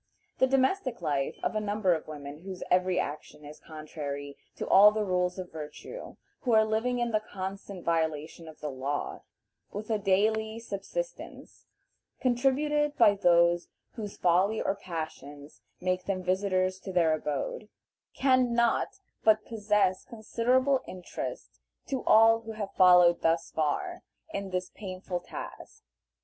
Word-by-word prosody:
The 260 - +5
domestic 265 +2 +1
life 140 -3 -1
of - - 0
a - - +2
number 205 -3 +1
of 160 - -4
women 145 -1 -8
whose 185 +1 -7
every 180 0 +3
action 150 0 -5
is 150 +1 -11
contrary 145 -2 -7 0.2
to - - -5
all 205 +2 +8
the 215 0 -1
rules 180 -1 0
of 185 -1 -6
virtue, 160 - -8 0.2
who 245 - 0
are 220 0 +6
living 225 +3 0
in 240 -1 0
the 215 - +2
constant 195 -2 -7
violation 160 0 -1
of 155 - -13
the 150 - -3
law, 135 +2 -3 0.5
with 210 +2 -5
a 215 - +1
daily 220 +3 +1
subsistence 230 - -6 0.5
contributed 285 +4 +1
by 220 -4 +6
those 175 -2 +3 0.2
whose 210 -3 -7
folly 185 +5 +3
or - - 0
passions 155 -6 -8 0.2
make 185 0 -1
them 185 -2 -2
visitors 185 0 0
to 190 +1 -7
their 170 -3 +3
abode, 155 - -3 0.5
can 255 -3 +3
not 235 -1 +1 0.2
but 215 -1 +4
possess 210 -4 +1
considerable 250 +4 +1
interest 185 -1 -7 0.3
to 265 -2 -3
all 225 +1 +6
who 225 0 -7
have 205 -2 -5
followed 180 -2 +6
thus 165 0 +1
far 160 - -1 0.3
in 200 -1 -3
this 185 0 -3
painful 185 -2 -5
task. 175 - -9
190 Hz, 145 wpm, -29 LUFS, 170-225 Hz, 0.5 s, all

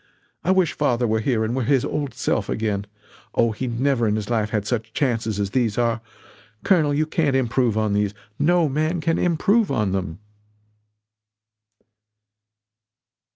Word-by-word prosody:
I - - -2
wish 185 -2 +3
father 125 -5 +1
were 110 -1 +1
here 110 -1 0
and 115 +3 -2
were 130 - 0
his 130 +1 +2
old 145 -3 -3
self - - -1
again 105 -2 -2 0.5
Oh, 115 -1 +3
he 125 +4 -4
never 120 0 +1
in 105 - +1
his 110 +1 -4
life 110 -2 +1
had 105 -2 -1
such 115 0 -3
chances 115 -6 -1
as 100 -1 -1
these 115 -4 0
are. 115 -2 +1 0.6
Colonel; 165 -7 +3
you 150 +2 +1
can't 155 -3 0
improve 120 -3 +1
on 110 -2 +1
these 105 0 0 0.2
no 170 +2 +3
man 155 +5 0
can 165 +1 0
improve 195 +6 +2
on 105 -7 0
them!" 95 -3 -3
120 Hz, 155 wpm, -22 LUFS, 110-145 Hz, 0.6 s, wish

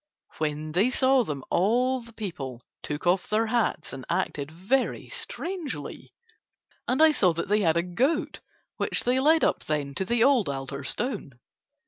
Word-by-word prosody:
When 155 0 -2
they 190 +10 +3
saw 260 0 +4
them 145 - -5
all 245 +8 +2
the 235 0 -14
people 140 - -6 0.2
took 150 +3 -5
off 180 +1 +2
their 220 +2 +2
hats 230 0 -1
and 135 -1 -7
acted 140 -1 -1
very 195 +11 -1
strangely, 380 -8 -5 0.8
and 260 +5 +3
I 320 - +7
saw 185 - +3
that 170 +3 -4
they 210 +1 +3
had 165 -3 +3
a 170 - +2
goat 260 - 0 0.4
which - - +1
they 250 +2 +2
led 315 +4 +4
up - - +1
then 145 -2 -2
to 190 - -1
the 235 +3 +2
old 255 - +4
altar 140 0 -5
stone. 190 - -3
205 Hz, 165 wpm, -26 LUFS, -, 0.8 s, I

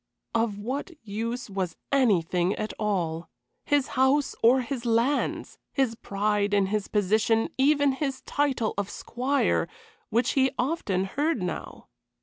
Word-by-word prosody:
Of 225 -3 +1
what 255 - -3
use 230 +5 -4
was 190 -5 -3 0.2
anything 185 -8 +2
at 215 - -4
all? 175 -6 -1 0.4
His 290 -2 +2
house 265 +2 +2
or 250 +3 +5
his 250 0 -4
lands! 235 +4 0
His 265 -5 +1
pride 205 -1 0
in 200 -1 +3
his 205 +1 -1
position 215 +2 +2
even 285 +1 +4
his 270 -1 -3
title 270 -6 0
of 200 -1 -2
"squire," 265 +7 0 0.4
which 230 +2 +2
he 265 -1 +3
often 245 - 0
heard 280 - -1
now. 175 -2 -5
230 Hz, 135 wpm, -27 LUFS, 200-265 Hz, 0.4 s, or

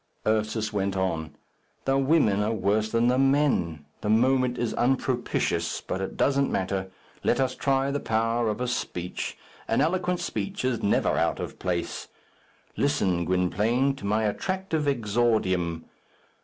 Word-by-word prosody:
Ursus 110 0 0
went 100 -1 -1
on, 80 -4 -2 0.5
"The 135 - +2
women 135 -7 +3
are 105 +2 +1
worse 105 +1 +1
than 115 +1 +2
the 125 +1 +3
men. 135 - +2 0.2
The 105 - -2
moment 125 +2 +3
is 120 -2 -1
unpropitious, 125 0 0
but 95 - -4
it 95 - -5
doesn't 140 0 +2
matter! 95 0 -1 0.3
Let - - +2
us 130 -1 +1
try 135 0 +1
the 145 - -1
power 115 0 0
of 105 - -2
a 125 - 0
speech; 90 -7 -3 0.3
an - - +1
eloquent 180 +4 +1
speech 190 -1 -3
is 130 -3 0
never 100 - +2
out - - +1
of - - -6
place. 90 -2 -3 0.7
Listen, 95 -12 +1
Gwynplaine, 105 +10 +1
to - - -12
my 110 +2 +1
attractive 160 - -1
exordium. 105 -9 +1
115 Hz, 145 wpm, -26 LUFS, 100-135 Hz, 0.7 s, women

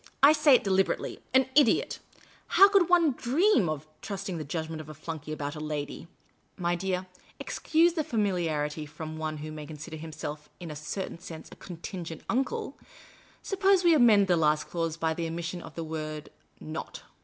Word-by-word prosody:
I 290 +2 +9
say 300 -3 +6
it - - +2
deliberately 195 -1 0
— - - -35
an 260 -1 +5
idiot! 290 +1 +3 0.6
How 395 - +10
could 390 -4 +4
one 340 -4 +5
dream 255 - +2
of 155 -1 -3 0.2
trusting 195 -3 -4
the - - -3
judgment 160 +2 -4
of 155 - -12
a 155 - -8
flunkey 155 0 -6
about 145 -1 -4
a - - -6
lady? 150 +1 -4 0.5
My 175 -2 0
dear 185 +1 -1 0.2
— - - -29
excuse 330 +2 +2
the 320 -2 0
familiarity 165 - -1
from 155 +1 -7
one 155 -1 -3
who 155 - -6
may 150 -1 -7
consider 155 +1 -8
himself 150 -1 -7
in 170 -3 -7
a - - -6
certain 160 +4 -5
sense 160 -2 -9
a - - -10
contingent 170 -2 -7
uncle 260 +3 -1 0.3
— - - -27
suppose 390 -1 +3
we 340 -1 +6
amend 230 -8 +6
the 180 -2 +3
last 150 -1 +3
clause 165 -2 -2
by 160 -1 0
the 165 0 -3
omission 170 +2 -4
of 160 - -11
the 165 - -3
word 155 -1 -5 0.3
not. 155 +1 -7
165 Hz, 190 wpm, -28 LUFS, 155-225 Hz, 0.6 s, How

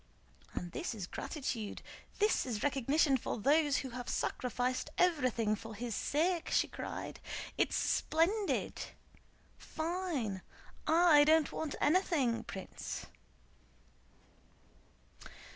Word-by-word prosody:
"And 175 -1 -4
this 250 - -3
is 200 -4 -4
gratitude—this 265 - -2
is 220 -4 -2
recognition 275 +1 +3
for 235 - -3
those 290 +5 +3
who 260 - -3
have 245 0 -6
sacrificed 250 +3 -1
everything 255 -11 +2
for 225 +1 -9
his 235 +2 -4
sake!" 335 - 0
she - - +3
cried. - - -6 0.4
"It's - - +1
splendid! 380 +6 +1 0.8
Fine! 315 - -2 0.5
I 320 -2 +7
don't 315 0 +4
want 315 -2 -3
anything, 295 -8 +2
Prince." 190 - -6
280 Hz, 95 wpm, -34 LUFS, 235-325 Hz, 0.8 s, I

